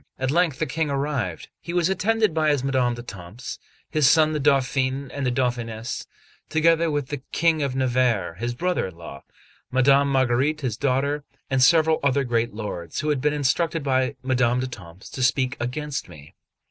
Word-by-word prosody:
At 130 0 -1
length 165 -3 +2
the 155 - 0
King 155 +1 -2
arrived; 135 - -2
he 170 - -7
was 175 -2 +3
attended 215 +1 +1
by 155 -1 +2
his 145 -3 +1
Madame 130 -3 +1
d'Etampes, 115 -1 -8 0.3
his 150 -4 +3
son 155 -2 +5
the 155 - -1
Dauphin 135 -1 +1
and 140 -2 -2
the - - +1
Dauphinéss, 120 -2 -2 0.4
together 165 +1 +3
with 145 -3 -2
the 145 -3 -4
King 165 -2 +2
of 135 -2 -1
Navarre 125 -8 +1
his 120 +7 -4
brother 180 - 0
in 90 - -11
law, 80 -5 -10 0.5
Madame 140 +2 +4
Marguerite 135 +3 +1
his 125 -6 -2
daughter, 140 +3 0 0.3
and 135 -1 +2
several 160 +4 +5
other 140 0 +2
great 120 -2 0
lords, 105 - -5
who 155 - -2
had 145 -3 0
been 150 +2 +2
instructed 150 +3 0
by 130 0 +1
Madame 125 -2 +2
d'Etampes 100 -9 -7
to 130 - -5
speak 130 0 +2
against 140 +1 -4
me. 75 -4 -14
135 Hz, 175 wpm, -24 LUFS, 120-150 Hz, 0.5 s, son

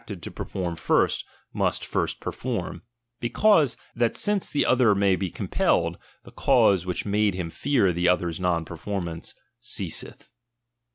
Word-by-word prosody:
traded 95 -6 -8
to - - -6
perform 90 -3 -4
first, 80 - +1 0.3
must - - 0
first - - -1
perform; - - -4 0.4
be 120 - -2
cause, 165 - +4 0.2
that 120 -1 +1
since 205 -2 +1
the 145 - +1
other 125 -5 +4
may 100 -1 +3
be 90 0 -2
compelled, - - 0 0.3
the - - -14
cause 95 -2 +3
which 90 - -2
made 105 -1 +1
him 90 -3 -4
fear 120 - +2
the 90 +1 +2
other's 85 -2 0
uon 85 -3 0
perfor 95 +4 -4
mance, 85 -1 -6 0.2
ceaseth. 105 -8 -4
95 Hz, 155 wpm, -25 LUFS, 90-120 Hz, 0.4 s, cause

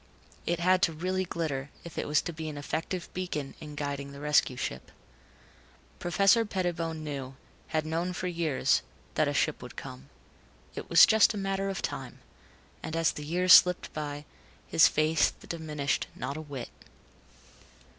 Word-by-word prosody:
It 170 0 0
had 185 +1 +3
to 165 -5 +3
really 185 +4 -1
glitter 145 -6 -3
if 170 - -10
it - - -3
was 150 0 +2
to 170 - -4
be 160 0 -5
an 150 - -7
effective 165 +5 -3
beacon 175 -7 -4
in 150 -1 -9
guiding 140 -1 -4
the 140 - -10
rescue 150 -3 +2
ship. 65 - -5 1.1
Professor 195 +5 +4
Pettibone 170 -6 -2
knew 135 -3 -5 0.3
had 155 -1 -1
known 165 +3 -1
for 180 - -4
years 165 -5 +1 0.3
that - - +2
a - - 0
ship - - +1
would - - -10
come. 65 +2 -9 0.6
It - - -7
was - - +9
just 220 0 +4
a - - -4
matter 195 0 -1
of 195 - -4
time, - - -5 0.6
and 160 - -5
as 165 -1 +2
the 150 - -7
years 180 +4 +4
slipped 180 -1 +6
by, 145 -1 -5 0.4
his 160 - +6
faith 155 +1 +2
diminished 150 -4 -2
not 140 - -4
a 155 - -5
whit. 140 -5 -7
160 Hz, 165 wpm, -29 LUFS, 145-180 Hz, 1.1 s, was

